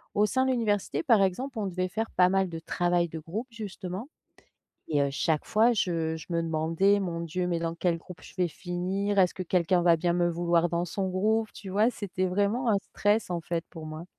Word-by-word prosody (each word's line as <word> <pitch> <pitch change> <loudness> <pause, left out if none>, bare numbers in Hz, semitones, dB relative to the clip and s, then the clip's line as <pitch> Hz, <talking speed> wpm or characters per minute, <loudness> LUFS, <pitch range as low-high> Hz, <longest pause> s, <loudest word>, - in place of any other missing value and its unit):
au 210 - +4
sein 260 +5 +1
de - - +2
l'université 220 - 0
par 230 -8 +5
exemple, 230 +6 -1
on 205 - -1
devait 185 0 -2
faire 225 +4 -2
pas 180 0 +4
mal 190 -1 +1
de 165 - -5
travail 175 0 0
de 160 - -6
groupe 190 - -5
justement. 205 +1 -6 0.8
Et 145 -3 +2
heu, 140 - +2
chaque 150 +2 0
fois 225 +3 +4
je 165 -5 0
je 160 - -10
me 170 0 +1
demandais: 165 +5 +2
«Mon 170 -3 -3
Dieu, 180 +2 -2
mais 170 -1 0
dans 165 0 -2
quel 170 -1 0
groupe 180 +2 -12
je - - -13
vais 180 -1 +1
finir? 185 +4 -2
Est-ce 180 -2 +4
que 185 - -4
quelqu'un 175 0 +2
va 170 -1 +5
bien 170 +1 +1
me 175 0 +2
vouloir 170 0 +2
dans 170 0 0
son 190 +2 -2
groupe?» 215 +4 +1
tu 195 - -9
vois? 210 +5 +3
C'était 185 -4 -3
vraiment 205 +6 +1
un 205 - +3
stress 205 +2 0
en 170 -1 -1
fait 170 0 -2
pour 160 -2 -9
moi. 155 +1 -7
180 Hz, 225 wpm, -28 LUFS, 170-205 Hz, 0.8 s, par